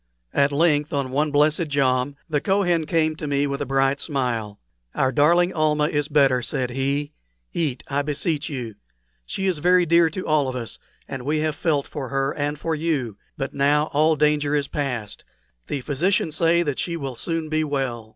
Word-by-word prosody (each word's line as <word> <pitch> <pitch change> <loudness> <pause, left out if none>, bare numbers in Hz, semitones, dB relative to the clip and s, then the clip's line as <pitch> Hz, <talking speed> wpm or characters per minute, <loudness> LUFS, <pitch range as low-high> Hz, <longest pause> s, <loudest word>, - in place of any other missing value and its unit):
At 140 0 +3
length 150 0 +2
on 140 -2 -1
one 150 +3 +1
blessed 150 +2 +2
jom, 135 -1 +1
the 150 -3 0
Kohen 175 -5 +1
came 155 -1 +1
to 150 - -5
me 140 0 +1
with 140 -1 -3
a - - -2
bright 135 +1 +1
smile. 120 -8 -2 0.4
"Our 130 -1 +2
darling 170 +7 +3
Almah 150 -1 +2
is 145 -2 -1
better," 135 -4 +3
said 125 +1 -2
he. 140 +3 -1 0.4
"Eat, 140 -7 -2
I 140 0 0
beseech 150 +2 -2
you. 125 -6 -5 0.5
She 195 - -3
is 185 -5 0
very 180 +2 +4
dear 170 0 +4
to 185 +4 -6
all 150 -3 +2
of 130 - -4
us, 120 -3 -6 0.3
and 135 - -5
we 150 +4 0
have 155 -1 0
all - - -19 0.2
felt - - -17
for 140 -4 -6
her 135 0 0
and 145 0 -2
for 165 +2 -2
you. 150 -9 -1 0.2
But 135 - -4
now 145 +2 +2
all 155 +2 +4
danger 150 0 +2
is 145 -1 0
past. 125 -8 -4 0.4
The 140 - -3
physicians 155 +4 0
say 170 +1 +3
that 145 -4 -2
she 170 -1 -2
will 135 -5 -5
soon 165 +4 -3
be 155 0 0
well." 130 -6 -3
145 Hz, 195 wpm, -23 LUFS, 135-155 Hz, 0.5 s, very